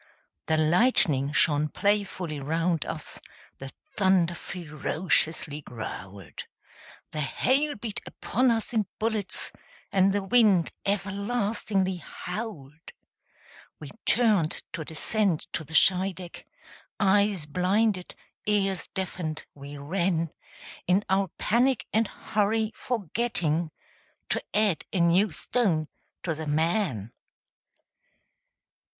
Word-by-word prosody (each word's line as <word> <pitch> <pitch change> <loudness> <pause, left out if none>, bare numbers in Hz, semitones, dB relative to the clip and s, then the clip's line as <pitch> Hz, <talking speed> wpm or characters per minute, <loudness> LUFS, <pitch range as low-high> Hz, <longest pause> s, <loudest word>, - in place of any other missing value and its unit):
The 160 - +2
lightning 155 - +4
shone 150 0 +3
playfully 195 -5 -1
round 165 +3 0
us; - - -5 0.4
The 135 0 -7 0.2
thunder 190 -3 +3
ferociously 160 -1 -1
growled; 100 - -8 0.7
The 155 -1 -2
hail 275 - +1
beat 220 -1 -5
upon 255 +4 +1
us 230 +1 0
in 215 -3 +1
bullets; 215 -3 0 0.4
And 195 0 +4
the 200 0 0
wind 200 -5 +4 0.2
everlastingly 200 -1 0
howled. 170 - -7 0.9
We 150 -3 -8 0.2
turned 210 -9 +3
to 165 -2 -3
descend 180 +2 0
to - - -2
the 160 +2 -7
Scheideck, 185 -1 +2 0.5
Eyes 200 -3 +3
blinded, 185 +5 0 0.3
ears 195 -3 +1
deafened, 175 -5 -3
we 140 +1 -9
ran, 165 +2 0 0.6
In 185 +3 +3
our 195 0 +3
panic 245 -1 +2
and 220 0 +3
hurry, 215 +1 0
forgetting 180 -7 -1 0.6
To - - +1
add 210 -5 +2
a 190 - -1
new 175 +4 +4
stone 160 -3 0 0.3
to 165 - -1
the 155 0 -6
man. 155 - 0
185 Hz, 100 wpm, -27 LUFS, 155-210 Hz, 0.9 s, lightning